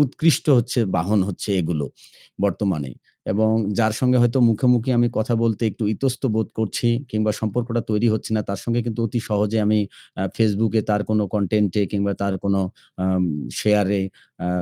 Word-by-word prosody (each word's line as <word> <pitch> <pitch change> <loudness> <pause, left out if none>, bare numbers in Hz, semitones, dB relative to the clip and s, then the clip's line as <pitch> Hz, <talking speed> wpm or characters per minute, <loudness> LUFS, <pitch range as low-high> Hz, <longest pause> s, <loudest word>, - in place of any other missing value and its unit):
উৎকৃষ্ট 150 +4 +2
হচ্ছে 120 +1 0 0.2
বাহন 100 +6 +2
হচ্ছে 100 - -6
এগুলো 80 -4 -2 0.6
বর্তমানে। 90 -9 -2 0.4
এবং 110 +2 +2 0.3
যার 110 -1 +3
সঙ্গে 125 -1 +3
হয়তো 120 +2 +2
মুখে, 115 +3 +1
মুখে 120 +2 0
আমি 120 0 +4
কথা 115 +2 0
বলতে 115 0 0
একটু 105 - -5
ইতস্তত 130 +3 -2
বোধ 110 - 0
করছি 110 +2 0 0.2
কিংবা 110 0 +1
সম্পর্কটা 115 +2 -1
তৈরি 105 +2 +2
হচ্ছে 110 - -4
না, 105 - +1
তার 100 -1 -3
সঙ্গে 120 0 0
কিন্তু 115 -1 -3
অতি 120 +1 -2
সহজে 105 +1 +1
আমি 105 0 +3 0.4
আ - - 0
Facebook 110 0 +2
এ - - -5
তার 105 0 +2
কোনো 105 -1 +2
content 105 -1 +1
এ - - +3
কিংবা 100 -1 0
তার 100 -1 0
কোনো 100 -1 +2 0.4
আম 95 0 +1 0.4
share 105 -2 +3
এ - - 0 0.4
আ - - -2
110 Hz, 180 wpm, -22 LUFS, 100-115 Hz, 0.6 s, আমি